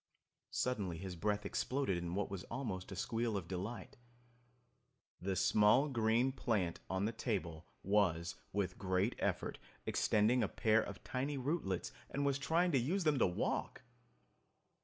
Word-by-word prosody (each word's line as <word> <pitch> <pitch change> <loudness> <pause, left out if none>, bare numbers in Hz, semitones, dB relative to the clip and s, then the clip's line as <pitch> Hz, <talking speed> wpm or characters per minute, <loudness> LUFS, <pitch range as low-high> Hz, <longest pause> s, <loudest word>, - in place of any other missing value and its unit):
Suddenly 100 -9 -1
his 90 +1 -5
breath 105 +4 -1
exploded 135 -7 0
in 85 0 -3
what 100 0 -1
was 95 -2 -4
almost 110 -8 -4
a - - -4
squeal 115 +2 -1
of 90 -4 -5
delight. 100 +9 -5 1.2
The 95 +1 -1
small 105 - +5
green 115 +1 +2
plant 105 -10 0
on 95 +1 0
the 110 - 0
table 90 -9 -3 0.2
was 90 -4 +2 0.2
with 95 -3 -1
great 95 +4 +1
effort - - -1 0.3
extending 110 +4 +3
a - - +2
pair 110 0 +3
of 100 - -7
tiny 135 +3 -2
rootlets 130 - -1 0.2
and 140 0 -1
was 140 -1 +1
trying 170 +5 +2
to 135 - +4
use 175 +11 0
them 150 -4 +3
to - - +5
walk! 90 - -2
105 Hz, 150 wpm, -36 LUFS, 95-130 Hz, 1.2 s, small